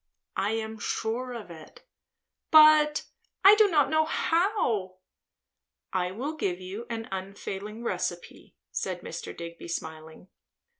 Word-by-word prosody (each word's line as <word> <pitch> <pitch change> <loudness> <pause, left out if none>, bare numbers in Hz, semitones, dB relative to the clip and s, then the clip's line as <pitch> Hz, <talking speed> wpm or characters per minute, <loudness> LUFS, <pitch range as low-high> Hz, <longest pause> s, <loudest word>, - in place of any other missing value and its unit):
"I 200 +3 +1
am 220 -1 -4
sure 240 +5 -2
of 215 -7 -8
it." 160 -2 -13 0.7
"But 305 -1 +7 0.5
do 425 -1 +6
I 295 -4 +5
know 315 0 +2
how?" 315 - 0 1.0
"I 180 -1 0
will 255 +11 -4
give 185 - -2
you 195 +6 -7
an 225 -1 -4
unfailing 200 +3 -6
recipe," - - -4 0.2
said - - -3
Mr. - - -7
Digby 170 0 -8
smiling. 160 +1 -7
220 Hz, 115 wpm, -28 LUFS, 185-295 Hz, 1.0 s, But